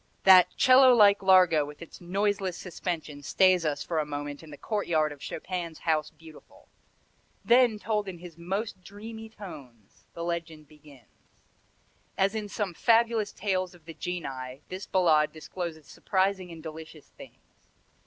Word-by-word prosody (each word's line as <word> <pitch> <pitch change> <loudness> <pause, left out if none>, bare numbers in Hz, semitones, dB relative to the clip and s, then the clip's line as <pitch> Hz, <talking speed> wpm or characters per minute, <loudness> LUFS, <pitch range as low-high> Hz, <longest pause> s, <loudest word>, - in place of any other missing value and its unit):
That 185 -2 +8
'cello 255 0 +7
like 205 -3 +5
largo 185 -5 +5
with 145 0 -10
its 170 - -12
noiseless 195 0 -1
suspension 165 -5 -5
stays 185 +4 +3
us 145 -1 -2
for 165 -2 -2
a - - +1
moment 145 -1 -6
in 160 - -13
the 145 - -10
courtyard 165 -8 -1
of 145 -1 -11
Chopin's 170 -1 -5
House 155 -2 0
Beautiful. 160 -1 -17 0.8
Then, 240 -2 +4
told 210 -1 -2
in 185 -2 -6
his 170 -1 -12
most 190 +3 -4
dreamy 220 +3 -10
tones, 135 - -13
the 170 - -5
legend 165 -3 -5
begins. 145 -6 -20 0.9
As 195 +1 +2
in 215 -2 -4
some 200 -3 -3
fabulous 225 +1 +2
tales 185 -2 -2
of 170 -3 -21
the 165 - -9
Genii 135 -7 -6
this 185 +2 -7
Ballade 160 -5 +3
discloses 160 -1 -7
surprising 190 +1 -1
and 165 -1 -11
delicious 160 -1 -10
things. - - -17
175 Hz, 150 wpm, -27 LUFS, 155-200 Hz, 0.9 s, That